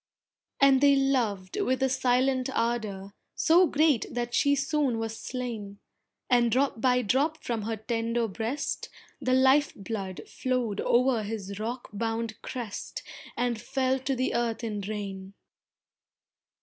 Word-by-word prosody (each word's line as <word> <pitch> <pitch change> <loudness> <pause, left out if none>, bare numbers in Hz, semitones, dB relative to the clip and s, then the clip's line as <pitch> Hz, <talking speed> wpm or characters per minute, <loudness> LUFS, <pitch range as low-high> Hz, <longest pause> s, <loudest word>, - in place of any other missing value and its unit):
And 275 -1 +6
they 285 -1 +6
loved 235 -9 0
with 260 +1 +1
a - - +4
silent 260 0 +1
ardour 215 -5 -2 0.2
So 345 +3 +5
great 295 -4 +2
that 240 0 -3
she 285 0 +3
soon 275 -3 0
was 225 0 -3
slain, 230 -6 -5 0.5
And 240 -2 +3
drop 260 -2 +1
by 250 0 +3
drop 285 +9 +1
from 230 -2 -2
her 225 - -2
tender 230 +1 -1
breast 230 +8 -3 0.3
The 255 0 +2
life 265 +3 +4
blood 195 -2 -5
flowed 250 -5 -2
o'er 245 -1 +3
his 205 -2 -5
rock 240 +3 -4
bound 225 +1 -3
crest, 250 - -6 0.3
And 240 -3 0
fell 265 -1 0
to 265 +1 -1
the 255 +1 0
earth 235 0 -1
in 210 -3 -3
rain. 195 -1 -6
240 Hz, 135 wpm, -28 LUFS, 220-265 Hz, 0.5 s, And